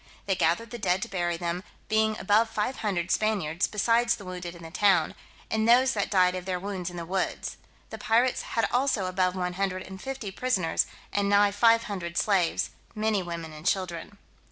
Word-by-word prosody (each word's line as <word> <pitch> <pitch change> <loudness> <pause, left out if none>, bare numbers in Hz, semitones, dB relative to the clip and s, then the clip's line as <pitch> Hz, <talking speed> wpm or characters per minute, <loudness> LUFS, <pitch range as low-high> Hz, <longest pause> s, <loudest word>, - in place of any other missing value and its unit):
They 195 - +1
gathered 185 +6 +1
the 240 - -6
dead 190 0 +1
to - - -4
bury 175 -4 -1
them, 175 +1 -3 0.2
being 220 0 +2
above 215 +4 +3
five 220 +5 -2
hundred 185 -4 -1
Spaniards, 195 -6 +1
besides 235 +3 +2
the 205 -4 -11
wounded 180 -1 -6
in 170 - -12
the 165 - -9
town, 180 -3 +3 0.4
and 220 +1 +1
those 255 +2 +5
that 205 -2 -1
died 180 -2 +4
of 185 -1 -5
their 185 -1 -2
wounds 185 -2 -4
in 175 - -9
the 170 - -5
woods. 190 +2 -2 0.3
The - - -7
pirates 240 +2 +2
had 230 - -1
also 250 -6 +1
above 185 0 0
one 180 -1 -2
hundred 185 0 -2
and 190 0 -10
fifty 265 -7 -5
prisoners, 190 -7 0 0.3
and 200 0 +1
nigh 205 0 +5
five 230 +2 +4
hundred 175 -5 -5
slaves, 190 -5 +1 0.2
many 215 -2 +1
women 170 -2 -6
and 155 0 -10
children. 185 +1 -2
195 Hz, 195 wpm, -27 LUFS, 180-220 Hz, 0.4 s, those